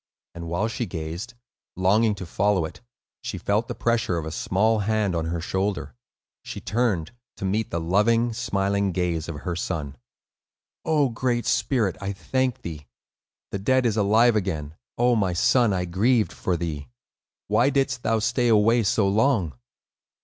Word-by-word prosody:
And 85 0 -7
while 85 +6 0
she 115 +1 -3
gazed, 85 +8 -6 0.4
longing 105 +4 +3
to 95 - -7
follow 95 0 +1
it, 80 - -10 0.4
she - - -5
felt 105 +3 0
the 120 - -5
pressure 115 -7 0
of 80 - -3
a 80 - -5
small 110 +7 +1
hand 105 -2 0
on 80 -1 -1
her 85 +1 -2
shoulder. 95 +4 -2 0.5
She - - -7
turned, 105 -7 0 0.3
to - - -4
meet 105 +4 0
the 85 - -2
loving, 115 +7 +2
smiling 100 -4 0
gaze 85 -2 -1
of 75 -3 -6
her 90 -2 -3
son. 80 -5 -3 0.9
"O 150 -4 +2
Great 120 0 -1
Spirit, 115 -9 +1
I 100 0 -3
thank 130 +8 -1
thee! 75 -4 -7 0.6
The 100 - -3
dead 130 +6 +2
is 110 -3 +2
alive 110 +3 +4
again! 80 -8 -2 0.2
O 120 0 +3
my 95 -5 +1
son, 120 +6 +3
I 90 -2 0
grieved 110 +6 +2
for 90 -2 -1
thee! 80 -4 -4 0.6
Why 115 +6 +3
didst 135 -3 0
thou 115 - +1
stay 120 +3 +1
away 115 +1 +4
so 100 -1 +2
long?" 100 - +2
100 Hz, 165 wpm, -24 LUFS, 85-115 Hz, 0.9 s, alive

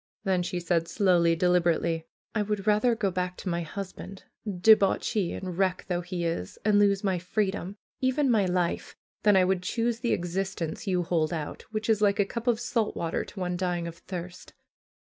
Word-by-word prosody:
Then 190 -3 +1
she 175 0 -2
said 170 -1 0
slowly, 170 -4 +3
delib 180 0 +3
erately: 165 -1 0 0.3
''1 210 -2 0
would 210 -2 -2
rather 215 +3 +3
go 205 -4 0
back 180 0 -2
to 190 - -4
my 170 0 -1
husband, 190 +2 -7 0.3
debauchee 200 0 +3
and 185 -2 -5
wreck 185 -1 +1
though 175 -1 -1
he 175 0 -4
is, 165 - -3
and 210 -1 +5
lose 200 -1 +3
my 190 -3 +1
freedom, 190 +1 -2 0.2
even 260 +2 +2
my 205 -5 +3
life, 180 -1 -1 0.3
than 210 -1 +5
I 185 - +5
would 185 -1 +1
choose 230 +5 -1
the 235 0 0
existence 175 0 -3
you 180 -2 +1
hold 165 -2 0
out, 155 -3 -5
which 215 0 -3
is 220 -2 +2
like 205 -1 +3
a 205 - +4
cup 235 +4 -6
of 235 -2 +3
salt 235 -3 -1
water 165 -1 -2
to 200 - -10
one 180 -1 -1
dying 175 -1 -1
of 170 - -7
thirst. 180 0 -8
185 Hz, 195 wpm, -28 LUFS, 175-210 Hz, 0.3 s, and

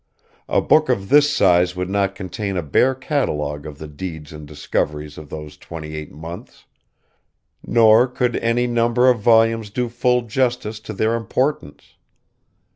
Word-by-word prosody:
A - - +2
book 155 -3 +3
of 100 -6 -1
this 145 +1 +5
size 90 -8 +3
would 90 0 -3
not 100 0 0
contain 100 0 -4
a 90 - -1
bare 125 - +2
catalogue 75 - -2
of 75 -2 -9
the 75 - -8
deeds 80 0 -8
and 75 -1 -10
discoveries 75 0 -3
of 75 -2 -11
those 75 -1 -8
twenty 80 -1 -8
eight 75 -1 -7
months; 80 +4 -10 1.0
nor 115 +1 +5
could 125 -1 -1
any 115 +1 +1
number 120 +1 +3
of 120 - -1
volumes 115 0 +3
do 120 +3 -2
full 125 +1 +1
justice 120 -2 -1
to 110 0 -8
their 110 +3 0
importance. 115 - -3
105 Hz, 155 wpm, -20 LUFS, 75-120 Hz, 1.0 s, this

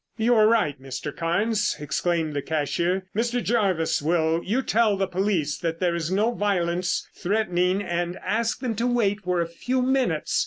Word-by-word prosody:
"You 235 +2 +3
are 215 -2 +5
right, 155 - +1
Mr. 135 +2 -6
Carnes," 205 +6 0
exclaimed 155 +2 -1
the 145 - -1
cashier. 170 +5 -1
"Mr. 240 +2 0
Jervis, 195 -11 +1
will 160 +1 +1
you 240 +7 0
tell 220 -3 +2
the 195 - +1
police 180 -5 -1
that 165 -1 -3
there 180 -2 +1
is 170 -1 -2
no 210 +5 +2
violence 180 -4 0
threatening 185 -1 0
and 175 0 -2
ask 230 +3 0
them 250 -4 -1
to 235 +2 +1
wait 215 -5 +1
for 180 -2 0
a 170 - -1
few 250 +10 -2
minutes? 255 - +1
185 Hz, 170 wpm, -25 LUFS, 165-220 Hz, -, are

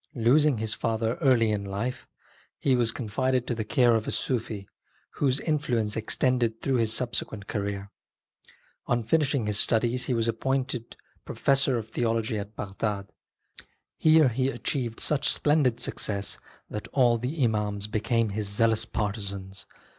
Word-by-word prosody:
Losing 135 +4 +4
his 110 0 -1
father 115 0 -1
in - - -10
early 115 -7 +3
life, 100 +5 -4 0.5
he 135 -2 +2
was 120 -2 +2
confided 125 +3 -1
to 125 - -1
the 110 -1 -2
care 120 +2 +3
of 110 -1 0
a - - -1
Sufi, 110 -5 -2 0.5
whose 135 -2 +2
in 155 -2 0
fluence 115 -7 -1
extended 115 0 0
through 135 -2 0
his 115 -2 +2
subsequent 110 -3 -1
career. 100 -1 -4 1.0
On 120 -1 +1
finishing 140 0 +1
his 105 0 +1
studies 120 +2 +2
he 125 - 0
was 115 0 0
appointed 125 +1 -2 0.3
pro - - -7
fessor 135 -2 +2
of 110 -1 -6
theology 115 -2 0
at 105 +1 -8
Bagdad. 100 0 -3 0.9
Here 155 -3 +5
he 130 +3 0
achieved 125 -4 -3
such 150 -2 +1
splendid 145 -6 +2
success 100 -2 -1 0.3
that 105 - -6
all 120 -4 +3
the 135 +5 -2
Imams 105 -3 0
became 110 +1 0
his 100 0 -2
zealous 110 +1 +2
partisans. 100 -3 -4
115 Hz, 150 wpm, -27 LUFS, 105-130 Hz, 1.0 s, Here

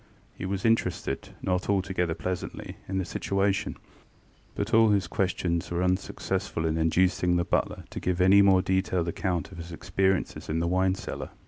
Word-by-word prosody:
He 95 - -5
was 95 +1 -2
interested, 90 -11 0
not 90 +1 -1
altogether 95 -4 0
pleasantly, 90 +2 -5
in 95 - -2
the 95 - 0
situation; 100 +1 -1 0.8
but 105 +3 -3
all 115 0 +6
his 100 -2 +2
questions 90 -3 -1
were 85 +1 -1
unsuccessful 95 -1 -1
in 80 -1 +1
inducing 90 +2 +2
the 85 0 +1
butler - - -1
to - - -5
give 90 0 -1
any 95 +2 +7
more 95 -2 +5
detailed 95 -2 0
account 90 -1 -2
of 90 - -10
his 85 +1 -8
experiences 95 +2 -1
in 80 - 0
the 85 - 0
wine 95 +1 +2
cellar. - - -6
95 Hz, 165 wpm, -27 LUFS, 85-95 Hz, 0.8 s, any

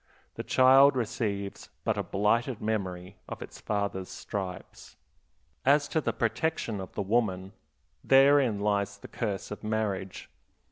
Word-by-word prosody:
The - - -5
child 135 +2 +6
receives 105 -4 -3
but - - 0
a - - -1
blighted 115 +4 0
memory 95 -4 -3
of - - -6
its - - -12
father's 100 -3 -2
stripes. 95 -3 -7 0.7
As 145 +2 +4
to 160 - 0
the 115 - 0
protection 115 -1 -1
of 95 - -8
the 100 - -2
woman, 95 -3 0 0.5
therein 135 -5 +5
lies 100 -1 0
the - - -11
curse 105 -5 -4
of 105 - -7
marriage. 105 -3 -3
105 Hz, 135 wpm, -28 LUFS, 100-120 Hz, 0.7 s, child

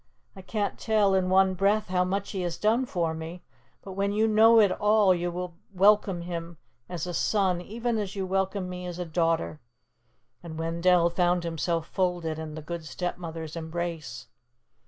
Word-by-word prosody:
I 190 - -10
can't 205 +2 -3
tell 215 -3 +2
in 185 -1 +2
one 190 0 +4
breath 200 +3 +1
how 180 -1 +2
much 195 +2 -2
he 190 - -3
has 175 -1 -3
done 230 +6 +1
for 170 -6 -1
me, 160 +2 -7 0.4
but 195 - -8
when 200 +1 -1
you 215 +2 +2
know 225 +1 +6
it 205 -3 +5
all, 210 -2 +4
you 175 0 -2
will 180 0 -5 0.2
welcome 195 -2 +4
him 170 -1 -6 0.3
as 175 -3 -4
a 175 - -5
son 185 -2 +1
even 230 +4 -2
as 200 -1 -4
you 195 -1 -2
welcome 190 0 -1
me 180 0 -6
as 175 -1 -6
a 180 - -3
daughter," 165 -1 0 0.8
and 160 -2 -8
Wendell 170 +1 +2
found 175 0 +1
himself 165 0 -1
folded 175 -3 -1
in 155 -1 -6
the 155 - -7
Good 170 +1 -5
Stepmother's 165 +1 -5
embrace. 165 -6 -5
180 Hz, 180 wpm, -27 LUFS, 170-195 Hz, 0.8 s, know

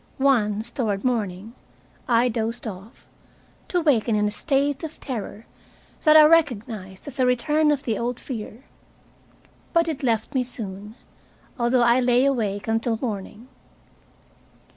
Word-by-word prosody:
Once, 235 -5 +1
toward 210 -7 -2
morning, 215 -3 -2 0.5
I 240 0 +3
dozed 230 +1 -3
off, 205 +2 -9 0.6
to 355 - 0
waken 240 -8 +2
in 210 0 +2
a - - -2
state 280 +4 0
of 315 -1 -7
terror 225 -4 -6 0.6
that 310 -1 +6
I 310 - +9
recognized 230 - 0
as 280 -1 -8
a 255 - +4
return 300 +5 +2
of 290 -2 0
the 225 -4 -2
old 245 +1 -3
fear. 235 -1 -7 1.1
But 335 -1 +3
it 310 -4 -3
left 230 0 -1
me 260 -2 +1
soon, 210 -3 -7 0.6
although 240 +1 +3
I 240 +1 +4
lay 250 +1 +3
awake 215 -7 -1
until 225 +1 0
morning. 215 0 -5
235 Hz, 140 wpm, -23 LUFS, 215-270 Hz, 1.1 s, I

